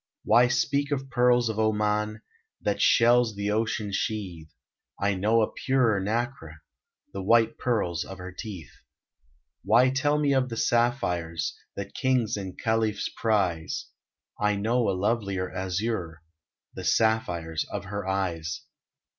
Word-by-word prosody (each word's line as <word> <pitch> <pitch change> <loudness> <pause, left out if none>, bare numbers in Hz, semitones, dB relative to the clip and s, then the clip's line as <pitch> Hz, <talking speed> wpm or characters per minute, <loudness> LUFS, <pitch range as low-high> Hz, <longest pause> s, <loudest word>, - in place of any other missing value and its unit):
Why 120 +1 +5
speak 140 +3 0
of 135 -2 -3
pearls 125 -1 +3
of 110 -1 -2
Oman 105 0 0 0.4
That - - -1
shells 120 -2 +4
of 100 0 -1
ocean 110 -1 -1
sheathe? 95 -6 -3 0.5
I 100 0 +1
know 110 +4 +2
a - - -2
purer 125 -6 +2
nacre, 105 - -3 0.5
The 95 - -4
white 115 +3 +3
pearls 105 -9 0
of 95 - -9
her 90 +1 -8
teeth. 90 - -8 0.9
Why 130 +2 +4
tell 145 +2 +1
me 145 -2 +2
of 130 -1 +1
the 115 - -5
sapphires 90 -11 0 0.2
That 100 0 -6
Kings 130 -4 +1
and 95 -3 -6
Khalifs 110 -2 0
prize? 95 -8 -1 0.5
I 105 0 +2
know 115 +3 +1
a 95 - 0
lovelier 100 -3 -1
azure, 90 -3 -3 0.5
The - - -7
sapphires 85 -8 +1
of - - -5
her 100 -1 -5
eyes. 85 -4 -2
105 Hz, 135 wpm, -27 LUFS, 95-120 Hz, 0.9 s, Why